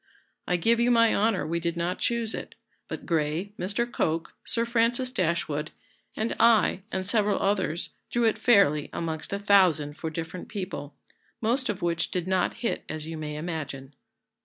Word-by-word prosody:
I 180 - +2
give 230 +7 +3
you 235 +1 +3
my 230 -2 +5
honour 215 -1 +2
we 170 +2 -1
did 170 0 -2
not 175 +2 -1
choose 235 -2 0
it; - - -6 0.3
but - - -6
Gray, 165 +3 0
Mr. 205 +6 0
Coke, 165 -8 -1
Sir 230 0 0
Francis 235 +2 +1
Dashwood, 170 -5 -1 0.5
and 220 +2 -1
I, 225 -5 +4
and 190 0 -2
several 205 0 +2
others, 190 -4 0 0.2
drew 240 - 0
it 225 -1 +2
fairly 175 - +4
amongst 160 -2 -3
a 200 - 0
thousand 185 -8 +3
for 160 - -3
different 165 +2 -6
people, 185 -8 -5 0.4
most 250 +4 0
of 200 -3 -3
which 170 -1 0
did 180 -1 -2
not 185 -1 +1
hit - - -1
as 155 -1 -4
you 165 0 -5
may 150 -1 -5
imagine." 150 -4 -5
185 Hz, 170 wpm, -27 LUFS, 160-220 Hz, 0.5 s, my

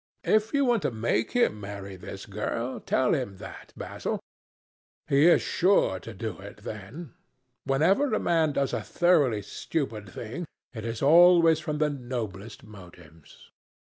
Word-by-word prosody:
"If 215 0 +2
you 280 -1 +2
want 240 -4 +2
to - - 0
make 115 -1 -1
him 240 - +2
marry 100 -1 -7
this 95 +2 -9
girl, 115 +4 -3
tell 130 - +1
him 125 - -2
that, - - -11
Basil. - - -4 0.9
He 145 +2 +4
is 175 - +5
sure 180 - +2
to 115 - -9
do 105 -2 -6
it, 100 +1 -12
then. 115 - -8 0.5
Whenever 180 - +2
a 215 - +1
man 160 -3 +1
does 140 -1 0
a - - -1
thoroughly 145 - +2
stupid 110 - -4
thing, 120 - -6 0.3
it 110 -2 -7
is 115 +1 -4
always 165 +1 +6
from 155 -1 -3
the 150 0 +1
noblest 120 -6 -6
motives." 90 -7 -15
125 Hz, 150 wpm, -27 LUFS, 105-165 Hz, 0.9 s, always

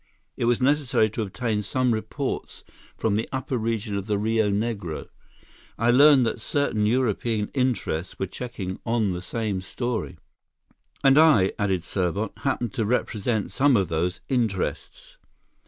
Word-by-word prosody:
It - - -1
was 120 0 +2
necessary 130 -5 +2
to 110 - -3
obtain 110 +1 -2
some 125 +4 0
reports 110 +5 -4 0.3
from 110 -2 0
the 110 - -2
upper 130 0 -2
region 110 -3 -2
of 100 0 -3
the 105 -2 +1
Rio 110 0 +1
Negro. 100 -6 -3 0.7
I 115 +1 +3
learned 140 0 +7
that 115 0 -2
certain 110 -5 0
European 115 -2 0
interests 125 - -1
were - - -1
checking 95 -2 -6
on 115 -4 +1
the 90 - -5
same 105 0 -3
story." 110 -2 -4 0.9
"And 135 +1 +6
I," 145 -13 +5
added 95 -4 0
Serbot, 100 +3 -1
"happened 120 -6 -1
to 110 - -1
represent 110 -2 -1
some 140 -2 +4
of 95 -4 0
those 85 +3 -1
interests." 130 - -2
110 Hz, 145 wpm, -25 LUFS, 100-125 Hz, 0.9 s, learned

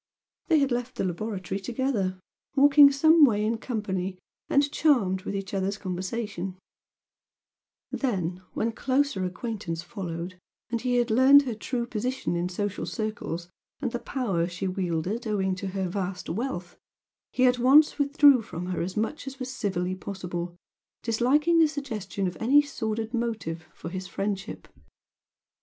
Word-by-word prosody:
They 320 - +4
had 275 -2 +2
left 245 +1 -2
the - - -2
laboratory 190 +1 -3
together, 210 -4 -1 0.4
walking 285 0 +8
some 315 +3 +5
way 215 -6 +4
in 225 +1 0
company 195 -6 -3 0.3
and 280 0 +3
charmed 225 -13 +2
with 200 - -4
each 195 0 -5
other's 195 +1 -1
conversation, 190 0 -4 1.3
then, 185 - -2
when 230 +1 0
closer 265 -3 0
acquaintance 180 -3 -4
followed, 175 -1 -6 0.3
and 235 -2 -1
he 250 -1 0
had 240 -1 +2
learned 265 +5 +7
her 250 -4 -3
true 235 +3 -3
position 245 -3 -2
in 175 +1 -1
social 205 +2 -3
circles 180 -6 -4 0.3
and 255 -5 -2
the 240 - -3
power 195 -13 -1
she 180 +2 -4
wielded 185 +5 -2
owing 190 -3 0
to 185 +2 -4
her 190 0 -2
vast 185 0 -4
wealth, 190 -4 -4 0.5
he 255 - +3
at 250 0 +3
once 285 +6 +6
withdrew 285 -2 +6
from 180 -4 -6
her 180 - -2
as 185 +3 -4
much 275 +8 -2
as 270 0 -6
was 260 0 -5
civilly 185 -7 -1
possible, 180 -2 -5 0.5
disliking 280 +9 +3
the 320 - +6
suggestion 225 -10 -4
of 180 - -2
any 265 +6 +5
sordid 225 -5 -2
motive 215 -9 -3
for 165 - -8
his 185 +1 -5
friendship. 195 +3 -4
215 Hz, 150 wpm, -27 LUFS, 185-255 Hz, 1.3 s, walking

